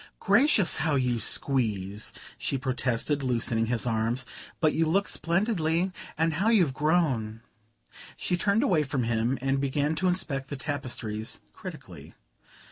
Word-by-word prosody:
"Gracious, 260 - +3
how 155 -2 +1
you 125 -3 +1
squeeze!" 110 -6 0 0.3
she 135 - -1
protested, 130 +2 -1
loosening 115 -3 +1
his 120 +1 +1
arms. 115 +2 0 0.3
"But 155 -2 +3
you 165 0 +1
look 195 +5 +2
splendidly 170 0 +1 0.3
and 160 +1 +1
how 195 +8 +1
you've 180 - +4
grown!" 135 -8 0 0.8
She 180 - -1
turned 200 +6 +2
away 180 - +3
from 135 -3 -1
him 115 +3 0
and 135 +1 0
began 145 +2 0
to 185 - +1
inspect 145 -7 -1
the 145 - -4
tapestries 120 -7 -4
critically. - - -10
140 Hz, 135 wpm, -27 LUFS, 120-165 Hz, 0.8 s, you've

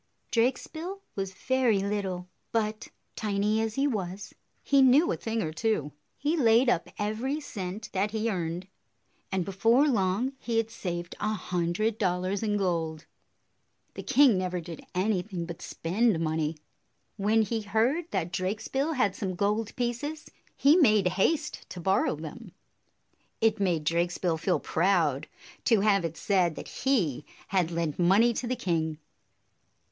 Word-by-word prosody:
Drakesbill 315 +10 -1 0.2
was 195 -1 -3
very 260 -3 +2
little, 195 -2 -2 0.2
but, 215 -1 -1 0.3
tiny 210 +1 0
as 225 -1 -2
he 275 - +1
was, 190 -5 -4 0.3
he 275 -1 +4
knew 265 +6 +5
a - - 0
thing 225 -1 -2
or 155 - -3
two. 160 -6 0 0.3
He 295 +4 0
laid 240 -3 +4
up 175 - +1
every 225 +8 -1
cent 205 -6 -6
that 195 +2 +1
he 220 +1 -1
earned; 175 -3 -2 0.6
and 190 -2 0
before 225 +9 +3
long, 220 +1 +1
he 230 -1 -2
had 225 0 0
saved 175 -5 -5
a 215 - 0
hundred 185 +3 -1
dollars 185 0 0
in 210 -2 0
gold. 165 -5 -1 0.9
The - - -6
king 265 -6 +5
never 180 -1 -2
did 170 -1 -8
anything 185 -2 -1
but 170 -1 -8
spend 195 +3 0
money. 160 -1 -1 0.6
When 215 +2 +3
he 220 +2 -2
heard 235 - 0
that 180 -3 -2
Drakesbill 220 - -1
had 205 -9 +1
some 190 -4 -3
gold 210 +3 0
pieces, 255 +6 -3 0.3
he 290 +5 +6
made 215 - +5
haste 295 - 0
to 180 - -7
borrow 190 -1 +2
them. 175 +6 -9 0.9
It 220 -1 +2
made 175 -6 +1
Drakesbill 170 +1 0
feel 180 +3 +1
proud 165 -5 +1 0.4
to 225 -4 +4
have 200 -3 +3
it 165 -1 -4
said 180 -5 +1
that - - -8
he 190 - 0 0.3
had 185 -4 +1
lent 165 -2 -2
money 200 +7 +5
to 240 - -3
the 255 - 0
king. 165 -8 -1
200 Hz, 150 wpm, -28 LUFS, 180-230 Hz, 0.9 s, he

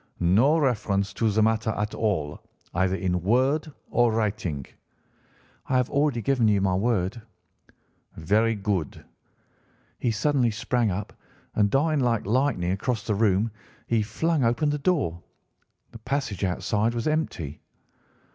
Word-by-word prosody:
No 110 - +4
reference 105 - 0
to 115 - +1
the 110 +1 +2
matter 110 +1 +1
at 105 +1 -2
all, 85 -10 -1 0.3
either 95 +2 +1
in 90 -2 -1
word 130 - +1 0.2
or 120 -1 +3
writing?' 105 -10 -2 1.0
"'I 130 - +2
have 125 -1 0
already 140 -5 +1
given 125 -1 +2
you 105 -2 +3
my 95 -1 +1
word.' 105 +1 0 1.0
"'Very 110 +8 +2
good.' 100 -7 -3 0.9
He 120 - 0
suddenly 125 +2 +2
sprang 115 +1 0
up, 100 +2 -4 0.4
and 105 -1 +2
darting 150 +5 +2
like 115 -3 +1
lightning 110 -6 +1
across 105 +3 -2
the 110 - 0
room 105 +1 +2 0.3
he 115 -2 +1
flung 145 +8 0
open 120 +6 +2
the 150 - -2
door. 140 - 0 0.7
The 115 - -11
passage 125 -5 -3
outside 105 +5 0
was 115 - -2
empty. 120 - -2
110 Hz, 135 wpm, -25 LUFS, 100-125 Hz, 1.0 s, No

